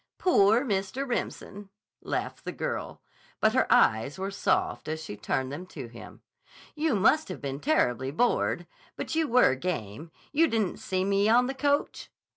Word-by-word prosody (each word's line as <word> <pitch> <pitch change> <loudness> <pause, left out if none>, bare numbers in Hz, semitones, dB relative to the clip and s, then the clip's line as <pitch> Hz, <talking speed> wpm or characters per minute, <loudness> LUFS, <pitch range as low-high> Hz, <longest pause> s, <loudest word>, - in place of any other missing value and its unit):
"Poor 230 - +4
Mr. 200 +5 -2
Remsen!" 205 -4 -4 0.3
laughed - - -4
the - - -4
girl, - - -5 0.4
but - - +3
her - - +1
eyes 110 +6 +3
were 195 +1 -3
soft 200 - 0
as 155 +1 -3
she 105 - -7
turned 130 +5 -2
them 175 +6 -7
to 140 -8 -8
him. 115 0 -12 0.5
"You 305 -4 0
must 270 +11 +3
have - - -6
been 140 -1 -5
terribly 130 - +1
bored. 205 - +1 0.3
But - - -5
you 320 -1 +1
were 245 - +5
game. 140 - -4 0.2
You 325 +3 +4
didn't 220 - -1
see 185 -1 -2
me 200 +1 +2
on 245 +2 +5
the 265 - -2
coach?" 285 +2 -1
195 Hz, 165 wpm, -28 LUFS, -, 0.5 s, were